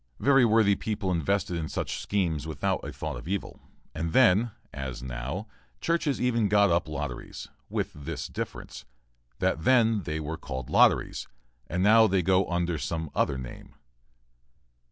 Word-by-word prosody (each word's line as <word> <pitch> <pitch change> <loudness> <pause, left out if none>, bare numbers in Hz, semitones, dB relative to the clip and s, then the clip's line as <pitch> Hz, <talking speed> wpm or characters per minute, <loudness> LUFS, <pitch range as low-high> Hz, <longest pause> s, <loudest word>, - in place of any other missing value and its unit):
Very 135 -2 +5
worthy 110 -3 +4
people 105 -2 -2
invested 90 +1 0
in 80 -2 -3
such - - -3
schemes 85 -7 -1
without 80 - -1
a - - -5
thought 75 -4 -5
of 60 - -10
evil, 100 +1 -3 0.3
and 80 +1 -3
then, 115 -2 +5 0.2
as 65 -2 -5
now, 65 - -4 0.3
churches 165 -4 0
even 115 -3 +2
got 100 -1 +4
up 85 -1 +1
lotteries, 75 - -6 0.2
with - - -2
this 75 0 -6
difference - - -6 0.5
that 80 - 0
then 115 -3 +4
they 80 -3 -3
were 80 +1 -4
called 65 -1 -6
lotteries, - - +3 0.4
and 90 +3 -1
now 110 +2 +7
they 95 -2 +1
go 95 +2 +3
under 85 -2 -1
some 80 +1 -3
other 70 - +1
name. 65 -2 -9
90 Hz, 155 wpm, -27 LUFS, 80-105 Hz, 0.5 s, now